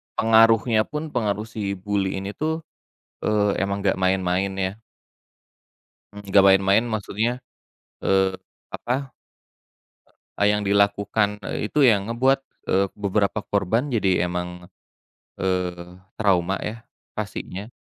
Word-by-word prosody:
pengaruhnya 115 0 +4
pun 150 0 -5
pengaruh 105 -3 -1
si 100 -3 -3
bully 95 0 -2
ini 100 - -4
tuh, 160 +5 -3 0.6
eee, 105 -1 +2
emang 100 +1 -1
enggak - - +1
main-main 95 +1 +1
ya. 95 0 -2 1.4
Enggak 100 -1 +3
main-main 95 +4 +4
maksudnya, 110 +3 -2 0.6
eee, 95 0 +2 0.4
apa, 130 +2 -3 1.3
e - - +2
yang 105 0 +2
dilakukan, 100 +1 +1
eee, 105 - -3
itu 150 +3 +2
yang 105 -4 +4
ngebuat, 130 +4 +2 0.3
eee, 95 +1 +3
beberapa 105 0 0
korban 110 +8 0
jadi 95 -6 +2
emang, 90 0 -5 0.7
eee, 90 -1 -2 0.2
trauma 95 -3 +1
ya 110 +1 -6 0.3
pastinya. 100 +4 -5
100 Hz, 110 wpm, -23 LUFS, 95-110 Hz, 1.4 s, pengaruhnya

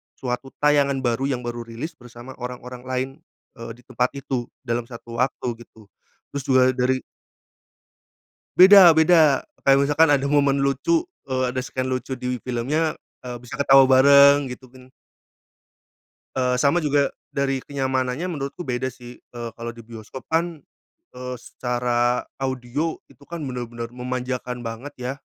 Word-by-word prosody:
suatu 125 +1 -4 0.2
tayangan 140 -2 +3
baru 120 +2 0
yang 130 -3 -2
baru 120 0 -5
rilis, 115 +8 -6
bersama 120 +1 -12
orang-orang 125 0 -7
lain, 130 0 -1 0.5
eee, 115 0 -7
di - - -20
tempat 125 0 -1
itu. 130 -3 -3 0.2
Dalam 120 -1 -2
satu 115 -1 -9
waktu, 130 0 -1 0.2
gitu. 110 -2 -20 0.4
Terus 140 -1 -4
juga 130 -1 +5
dari 130 +1 +1 1.6
Beda 190 -1 +10
beda. 160 -3 +4 0.2
Kayak 135 0 +5
misalkan 155 +3 +4
ada 140 -1 +3
momen 140 -1 +2
lucu. 140 - +1 0.2
Eee, 130 -1 0
ada 130 - 0
scene 130 0 -4
lucu 130 0 -3
di 125 -1 -3
filmnya, 140 +6 -1 0.3
eee, 125 -1 -6
bisa 125 0 -11
ketawa 135 0 +6
bareng, 140 +1 +6
gitu 125 +1 -9
kan? 130 0 -17 1.5
Eee, 125 -1 +2
sama 145 +4 +3
juga 145 -3 +1 0.2
dari 135 -1 0
kenyamanannya, 130 +3 -2
menurutku 140 +1 -5
beda 125 -3 -2
sih. 125 -1 -9
Eee, 120 -1 -8
kalo 115 0 -6
di 115 - -12
bioskop 115 +3 -10
kan, 165 -1 -1 0.5
eee, 125 0 -6
secara 120 0 -1 0.2
audio 135 +4 -2 0.2
itu - - -21
kan 170 -2 -6
bener-bener 120 -3 -5
memanjakan 125 0 -4
banget, 120 +5 -7
ya. 125 +1 -3
130 Hz, 145 wpm, -23 LUFS, 125-140 Hz, 1.6 s, Beda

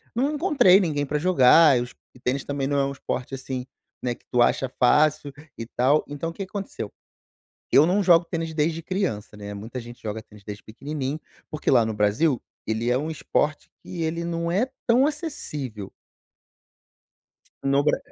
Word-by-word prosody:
não 275 +5 +1
encontrei 290 - +5
ninguém 150 -6 0
pra 150 +2 -1
jogar, 150 -4 +6
os 120 +1 -6 0.2
e - - -16
tênis 125 +2 -2
também 140 -1 -2
não 145 0 0
é 140 - +2
um 135 - -2
esporte, 130 -1 -5
assim, 130 -1 -5 0.4
né, 125 -1 -1
que - - -30
tu 125 - +3
acha 130 +2 +2
fácil, 150 +2 +3 0.2
e 115 - -5
tal. 130 +6 +2
Então 145 +3 -4
o - - -8
que 195 - -5
que - - -22
aconteceu, 195 - -5 0.8
eu 145 - +7
não 185 +5 +2
jogo 175 -3 +5
tênis 165 -1 -3
de - - -8
desde 160 +1 0
criança, 165 - -3
né, 105 0 -7
muita 110 +5 -7
gente 120 +1 -12
joga 110 0 -4
tênis 105 -1 -18
desde 105 0 -8
pequenininho, 140 +5 -5 0.3
porque 155 - -3
lá 120 -3 +5
no 110 - -2
Brasil, 110 +7 +1 0.2
ele 110 +2 -1
é 125 - +3
um 155 +4 -3
esporte 150 -1 -1
que 170 -2 -5
ele 165 +1 -2
não 170 0 -2
é 205 +10 +1 0.2
tão 250 +3 +5
acessível. 150 - -4 1.7
No 140 +1 +2
Bra 150 - +2
145 Hz, 185 wpm, -24 LUFS, 125-170 Hz, 1.7 s, eu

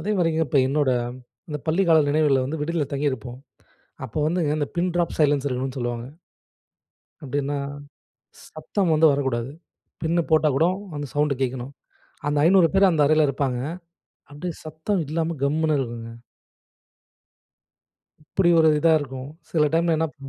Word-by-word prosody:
அதே 210 - -2
மாரிங்க, 165 -2 +1
இப்போ 145 - +2
என்னோட 145 -1 +1 0.6
அந்த 150 - -4
பள்ளி 165 +5 +2
கால 160 -2 +6
நினைவுகள்ல 145 -3 +2
வந்து 150 +3 -4
விடுதில 155 -1 -1
தங்கியிருப்போம். 130 -3 -3 0.7
அப்போ 120 +5 -5
வந்துங்க 160 -3 0
இந்த 145 - -1
பின் 175 +1 0
டிராப் 175 -1 0
சைலன்ஸ் 145 -2 +3
இருக்கணும்னு 130 0 -3
சொல்லுவாங்க. 120 -1 -3 1.2
அப்டின்னா, 145 0 -2 0.9
சத்தம் 170 +3 -2
வந்து 160 +1 +5
வரக்கூடாது. 130 -3 -1 0.5
பின்ன 165 +2 +1
போட்டா 155 -1 +4
கூட 160 - +3 0.3
அந்த 145 0 -4
சவுண்டு 145 -1 +1
கேக்கணும். 130 +1 -3 0.5
அந்த 145 0 0
500 175 -1 +5
பேர் 195 0 +5
அந்த 160 -4 +2
அறைல 155 0 +4
இருப்பாங்க. 135 -2 -1 0.7
அப்டியே 165 +3 -5
சத்தம் 160 +5 -2
இல்லாம 165 +1 -2
கம்முன்னு 155 +1 +1
இருக்குங்க. 115 -2 -5 2.1
இப்டி 175 +4 +1
ஒரு 160 -1 +6
இதா 165 +2 +4
இருக்கும். 135 -1 -7 0.2
சில 150 -3 +3
டைம்ல 165 0 +2
என்னப் 160 -4 -2
150 Hz, 140 wpm, -23 LUFS, 135-160 Hz, 2.1 s, கால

